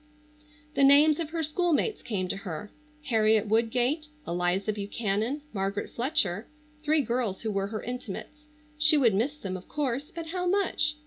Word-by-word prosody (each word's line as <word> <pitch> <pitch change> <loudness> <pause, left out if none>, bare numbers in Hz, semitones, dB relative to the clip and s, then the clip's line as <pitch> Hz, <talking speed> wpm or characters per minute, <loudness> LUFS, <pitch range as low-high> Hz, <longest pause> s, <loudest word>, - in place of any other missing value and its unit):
The 280 - +2
names 290 +3 +7
of 325 -3 -2
her 325 0 -2
schoolmates 350 +6 0
came 190 -5 -2
to 195 - -2
her. 195 +1 -6 0.3
Harriet 220 -4 +3
Woodgate, 245 +7 +1 0.2
Eliza 180 +4 0
Buchanan, 215 +6 -2
Margaret 195 0 -2
Fletcher, 235 - +1 0.4
three 305 0 +3
girls 235 -5 -2
who 220 - -1
were 195 -1 -1
her 215 +1 -5
intimates. 250 +5 -7 0.3
She 305 0 +6
would 240 -7 +4
miss 255 +9 0
them, 190 -9 -5
of 185 - -9
course, 280 -1 -2
but 330 -1 -6
how 360 +1 -2
much? 355 -5 +1
240 Hz, 155 wpm, -28 LUFS, 205-300 Hz, 0.4 s, names